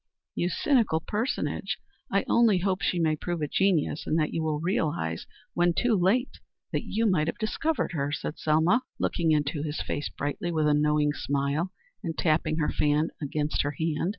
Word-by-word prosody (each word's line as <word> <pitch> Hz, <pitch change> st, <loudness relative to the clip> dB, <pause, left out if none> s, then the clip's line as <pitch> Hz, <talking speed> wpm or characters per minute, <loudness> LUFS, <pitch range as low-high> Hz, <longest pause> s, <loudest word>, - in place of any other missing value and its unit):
"You 175 Hz, -, 0 dB
cynical 220 Hz, -, +2 dB
personage! 220 Hz, -, -2 dB, 0.3 s
I -, -, +2 dB
only 230 Hz, -5 st, +4 dB
hope 185 Hz, +1 st, 0 dB
she 180 Hz, -, +1 dB
may 160 Hz, -2 st, +2 dB
prove 175 Hz, +2 st, -3 dB
a -, -, 0 dB
genius 175 Hz, -4 st, +1 dB
and 155 Hz, -, +1 dB
that 155 Hz, -2 st, 0 dB
you 165 Hz, -, -1 dB
will 155 Hz, -1 st, -1 dB
realize 150 Hz, -, -1 dB, 0.3 s
when 175 Hz, -1 st, +2 dB
too 240 Hz, -2 st, +2 dB
late 205 Hz, +8 st, +1 dB, 0.3 s
that -, -, 0 dB
you 225 Hz, +2 st, -1 dB
might 175 Hz, -7 st, +2 dB
have -, -, -2 dB
discovered 310 Hz, +9 st, -1 dB
her," 145 Hz, -4 st, -1 dB
said 150 Hz, +1 st, -4 dB
Selma, 160 Hz, +10 st, +3 dB, 0.2 s
looking 165 Hz, -2 st, +1 dB
into 150 Hz, 0 st, +1 dB
his 150 Hz, 0 st, -3 dB
face 145 Hz, -, -3 dB
brightly 175 Hz, +5 st, -3 dB
with 155 Hz, -2 st, +1 dB
a 150 Hz, -, +4 dB
knowing 150 Hz, 0 st, +2 dB
smile 145 Hz, +5 st, -1 dB, 0.3 s
and 165 Hz, -2 st, -4 dB
tapping 155 Hz, -1 st, +1 dB
her 150 Hz, -, +1 dB
fan 150 Hz, +2 st, +1 dB
against 150 Hz, +1 st, -1 dB
her 145 Hz, 0 st, -2 dB
hand. 160 Hz, +1 st, 0 dB
160 Hz, 180 wpm, -27 LUFS, 150-185 Hz, 0.3 s, only